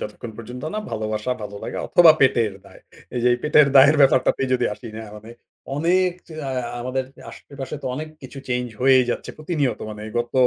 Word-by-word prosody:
যতক্ষণ 110 +2 -7
পর্যন্ত 125 +3 -9
না - - -1
ভালোবাসা 110 +1 -3
ভালো 105 -1 -7
লাগা - - -5
অথবা 170 -2 +7
পেটের 120 -5 +3
দায়। - - -16 0.3
এই 125 - -1
যে 125 - +4
এই 120 - 0
পেটের 150 -1 +5
দায়ের 145 +3 +7
ব্যাপারটাতে 135 -1 +4
যদি 125 -1 +2
আসি 115 - -11
না 110 - -7
মানে 110 +2 -12 0.5
অনেক 180 +4 +2 0.4
আ - - -3 0.3
আমাদের 130 +2 -2 0.3
আশেপাশে 140 0 -8
তো - - -4
অনেক 155 +4 -5
কিছু 135 +1 -10
চেঞ্জ 125 0 -1
হয়েই 130 0 +5
যাচ্ছে। - - -4
প্রতিনিয়ত 150 -8 -1
মানে 105 0 -8 0.2
গত 120 0 -3
130 Hz, 185 wpm, -22 LUFS, 115-145 Hz, 0.5 s, অথবা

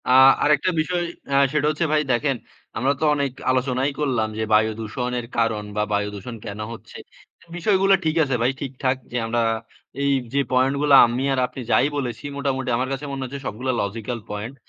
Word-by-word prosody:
আ - - +2 0.3
আরেকটা 150 +3 +3
বিষয়, 175 +2 -1 0.3
আ - - +3 0.2
সেটা 150 -1 +2
হচ্ছে, 155 +2 0
ভাই, 155 - +4
দেখেন 135 +3 +1 0.4
আমরা 130 +5 +2
তো - - -3
অনেক 140 -2 -1 0.2
আলোচনাই 130 +1 +1
করলাম 125 -7 0
যে, 110 - -1
বায়ুদূষণের 110 +3 0
কারণ 115 -2 +1
বা 105 - +1
বায়ুদূষণ 105 +3 -3
কেন 100 +1 -6
হচ্ছে? 115 - -11 0.6
বিষয়গুলো 195 +2 +3
ঠিক 155 0 +1
আছে 135 -3 0
ভাই, 120 +3 +3
ঠিকঠাক 135 -1 -1 0.2
যে, 125 - -2
আমরা 120 +1 0 0.6
এই 140 0 +2 0.2
যে, 140 - +2
পয়েন্ট 130 +2 +3
গুলো 145 -1 +3
আমি 120 +3 -2
আর 135 - 0
আপনি 130 - -8
যাই 130 - +5
বলেছি, 120 -3 -4
মোটামুটি 135 -2 -1
আমার 130 +1 -1
কাছে 135 +2 -5
মনে 135 -1 -4
হচ্ছে, 140 +2 -6
সবগুলো 125 +5 -4
লজিক্যাল 115 +4 -4
পয়েন্ট। 105 +6 -5
130 Hz, 180 wpm, -23 LUFS, 115-140 Hz, 0.6 s, যাই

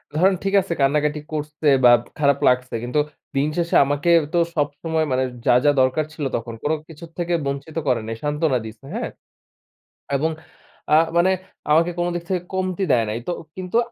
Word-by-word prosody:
ধরেন 185 +4 +4
ঠিক 195 0 -1
আছে 180 -2 -3
কান্নাকাটি 150 +2 +1
করছে 150 0 -3 0.2
বা 120 - +8 0.3
খারাপ 140 -1 +3
লাগছে 125 0 +2
কিন্তু 125 +5 0 0.4
দিন 140 +2 +2
শেষে 170 -1 0
আমাকে 145 +4 0 0.2
তো 175 - +3 0.2
সবসময় 155 +2 -1
মানে 130 0 +2 0.2
যা, - - +5
যা 145 - +6
দরকার 130 +4 +2
ছিল 155 -3 -6
তখন 115 0 -4
কোনো 155 +2 +1
কিছুর 165 +1 -11
থেকে 175 0 -1
বঞ্চিত 140 +4 -4
করে 125 -3 +2
নাই 115 - -3
সান্ত্বনা 150 -3 +1
দিছে। 110 +4 -11
হ্যাঁ? - - -3 1.1
এবং 160 +4 0 0.6
আ - - +8 0.2
মানে 180 +2 +4 0.4
আমাকে 165 +3 +4
কোনো 175 0 0
দিক 175 - -3
থেকে 180 -2 0
কমতি 185 +1 -1
দেয় 115 -3 +3
নাই। 110 - -2
তো - - +1 0.2
কিন্তু 185 +3 -3
150 Hz, 175 wpm, -22 LUFS, 135-170 Hz, 1.1 s, বা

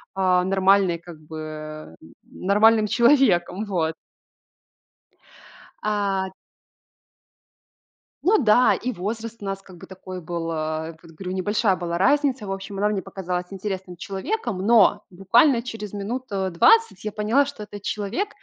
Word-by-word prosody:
а, 185 -1 +3
нормальной 190 -1 +3
как 170 -1 -13
бы, 155 +1 -10
э, 155 - -8 0.3
нормальным 215 +3 +3
человеком, 220 -6 +3
вот. 165 -5 -1 1.9
А 200 -2 0 1.9
Ну 425 +5 +4
да, 245 -1 +5
и 255 - -3
возраст 225 +4 -5
у - - -6
нас 195 0 -4
как 185 -2 -15
бы - - -11
такой 185 0 -9
был. 165 0 -4
А, 155 0 -3
этот 165 0 -14
говорю, 185 0 -6
небольшая 205 +1 +1
была 170 -1 -3
разница, 260 - +2
в - - -4
общем, 195 +1 -6
она 210 +1 +1
мне 205 -2 -1
показалась 180 -1 -4
интересным 190 -2 -5
человеком, 200 - -3
но 225 -3 +5
буквально 230 - +3
через 220 -4 -7
минут, 230 +6 -4
э, 190 -1 -1
20 455 - +4
я 215 - -3
поняла, 220 +7 +2
что 280 -6 -8
этот 205 -1 -10
человек 215 - -2
195 Hz, 140 wpm, -23 LUFS, 180-220 Hz, 1.9 s, да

